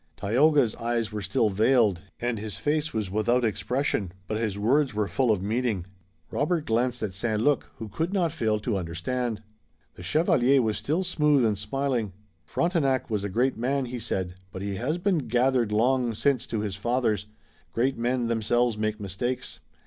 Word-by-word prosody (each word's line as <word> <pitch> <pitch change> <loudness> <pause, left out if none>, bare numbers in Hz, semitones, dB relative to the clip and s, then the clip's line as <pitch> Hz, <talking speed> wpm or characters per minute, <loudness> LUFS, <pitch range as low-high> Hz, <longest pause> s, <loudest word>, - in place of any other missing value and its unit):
Tayoga's 130 +3 +3
eyes 115 -2 -1
were 105 0 -4
still 110 0 +1
veiled, 110 -3 +3 0.2
and 120 -2 -1
his 105 -2 -6
face 150 +7 0
was 105 -4 -3
without 120 +4 +2
expression, 115 -3 -1
but 110 - -3
his 110 -3 -1
words 130 +4 +2
were 105 -1 +1
full 130 +2 +1
of 105 -4 +2
meaning. 110 -3 -1 0.5
Robert 155 +2 0
glanced 120 +1 0
at 100 -3 -2
St. 110 +2 -1
Luc, 145 +4 +1
who 110 - -7
could 160 - -2
not 180 -5 +1
fail 110 -8 0
to 105 -3 -1
understand. 105 +7 -3 0.5
The - - -12
chevalier 140 - +3
was 110 -4 +1
still 160 +6 0
smooth 150 -7 +3
and 110 -2 +2
smiling. 115 0 -2 0.3
"Frontenac 140 -9 0
was 105 -2 0
a 100 - -2
great 125 +7 +1
man," 135 +3 0
he 125 0 -5
said, 95 -5 -3 0.2
"but 95 - -6
he 100 -1 -3
has 135 - -1
been 180 -1 +1
gathered 120 -1 +2
long 120 +2 +2
since 135 +2 +1
to 110 - -2
his 100 -3 -3
fathers. 110 -2 0 0.4
Great 130 +3 +1
men 120 +1 0
themselves 115 0 +1
make 110 0 -1
mistakes. 100 -2 -3
115 Hz, 175 wpm, -27 LUFS, 105-135 Hz, 0.5 s, Tayoga's